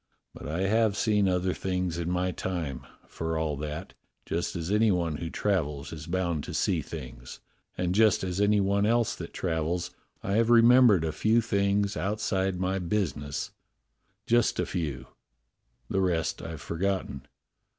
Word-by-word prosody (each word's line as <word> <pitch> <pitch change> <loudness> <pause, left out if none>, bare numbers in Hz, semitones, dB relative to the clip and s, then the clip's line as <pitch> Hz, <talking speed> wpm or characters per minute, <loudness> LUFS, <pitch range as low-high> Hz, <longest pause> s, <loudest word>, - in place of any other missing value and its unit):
But - - -9
I 80 +5 -2
have 110 +1 +2
seen 105 -3 +2
other 90 0 +1
things 90 -2 -2
in 85 0 -2
my 90 +1 0
time, 75 -9 -4 0.2
for 80 0 -3
all 80 -2 -1
that, 75 +2 -5 0.3
just 85 +3 -2
as 85 +1 -3
any 110 +1 +4
one 85 -5 0
who 85 - -4
travels 75 -10 -1
is 75 -1 -8
bound 85 -4 -1
to - - -6
see - - +1
things, 60 -1 -9 0.4
and, 90 0 0
just 110 -1 +4
as 95 +1 -1
any 105 0 +4
one 100 +1 +2
else 115 0 +2
that - - -8
travels, 85 0 -2 0.3
I 100 +2 0
have 115 0 +3
remembered 120 -5 +6
a 80 - -1
few 110 +9 +2
things 100 -2 +1
out 105 +3 -2
side 95 -3 0
my 95 +1 0
business, 75 -6 -2 0.7
just 120 0 +2
a - - +1
few; 75 -7 -3 0.8
the 95 - 0
rest 85 -3 0
I've 80 -3 -7
forgotten. 90 -6 -2
90 Hz, 160 wpm, -28 LUFS, 80-100 Hz, 0.8 s, remembered